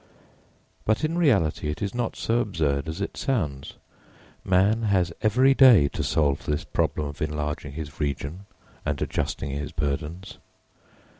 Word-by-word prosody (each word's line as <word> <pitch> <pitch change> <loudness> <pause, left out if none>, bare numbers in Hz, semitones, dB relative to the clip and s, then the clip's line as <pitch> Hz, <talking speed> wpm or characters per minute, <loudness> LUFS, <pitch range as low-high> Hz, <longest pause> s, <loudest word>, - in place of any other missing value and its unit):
But, 110 +5 +1
in 155 +2 0
reality, 100 - +2
it 75 - -4
is 100 -1 -3
not 120 -2 -2
so 115 +1 0
absurd 80 - -1
as 80 +5 -5
it 100 - -3
sounds. 75 - -2 0.7
Man 95 +5 +3
has 95 -6 +1
every 125 +5 +4
day 120 - +7
to - - -4
solve 70 -3 +1
this 75 0 0
problem 75 - -1
of 70 0 -7
enlarging 75 -1 -3
his 75 -1 -7
region 75 +6 -3 0.4
and 75 -2 -2
adjusting 70 - -2
his 70 +1 -4
burdens. 75 +5 -4
80 Hz, 145 wpm, -25 LUFS, 75-105 Hz, 0.7 s, day